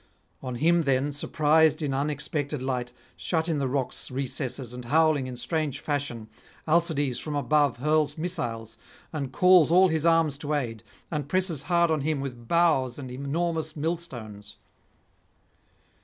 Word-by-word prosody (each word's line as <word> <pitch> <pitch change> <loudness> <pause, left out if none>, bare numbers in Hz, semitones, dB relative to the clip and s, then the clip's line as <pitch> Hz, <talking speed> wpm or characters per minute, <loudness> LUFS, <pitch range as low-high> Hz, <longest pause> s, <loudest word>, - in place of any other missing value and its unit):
On 125 -2 -5
him 170 +7 +3
then, 140 -1 +1
surprised 155 +2 +2
in 140 -2 -1
unexpected 145 0 -2
light, 125 -2 -2 0.2
shut 160 -1 -1
in 160 -3 0
the 135 - 0
rock's 130 0 -3
recesses 130 -1 -4
and 125 -1 -8
howling 155 -1 +3
in 125 -1 -7
strange 150 +1 -2
fashion, 140 -7 -3 0.4
Alcides 155 -6 +1
from 150 -2 -4
above 145 -2 +2
hurls 150 +2 +1
missiles 150 - -4 0.3
and 140 -4 -3
calls 180 0 +5
all 185 +2 +6
his 160 -2 0
arms 165 -4 +3
to 150 0 -2
aid, 115 -6 -3 0.3
and 150 -3 -3
presses 185 -6 +1
hard 170 -1 +3
on 155 -2 +1
him 150 0 -1
with 125 -4 -6
boughs 155 -7 +2
and 130 -3 -7
enormous 155 +4 -2
millstones. 120 -11 -5
145 Hz, 145 wpm, -26 LUFS, 130-160 Hz, 0.4 s, all